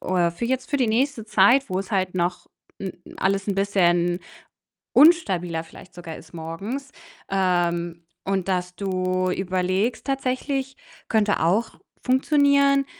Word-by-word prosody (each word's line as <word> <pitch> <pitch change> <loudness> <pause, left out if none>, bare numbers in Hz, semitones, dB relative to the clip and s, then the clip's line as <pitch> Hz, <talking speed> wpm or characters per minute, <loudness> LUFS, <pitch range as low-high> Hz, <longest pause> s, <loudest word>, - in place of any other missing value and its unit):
oder 180 -2 +1
für 170 +8 -5
jetzt 260 +2 -2
für 285 - +2
die 255 -3 +2
nächste 235 +1 0
Zeit, 235 +6 +4
wo 185 0 -1
es 195 - -9
halt 185 -3 0
noch 180 0 -1 0.3
n 190 -2 -5 0.2
alles 195 +1 0
'n 200 - +1
bisschen 175 -3 +2 0.7
unstabiler 185 - +4
vielleicht 165 - -15
sogar 170 -2 -8
ist 160 - -14
morgens. 195 - -6 0.4
Ähm, 175 -3 0 0.2
und 195 -1 -1
dass 180 -1 -2
du 185 -1 -1
überlegst 185 +4 -1
tatsächlich, 270 0 -2 0.3
könnte 215 -2 +2
auch 195 +8 0 0.2
funktionieren, 280 +1 +3
195 Hz, 135 wpm, -23 LUFS, 180-255 Hz, 0.7 s, Zeit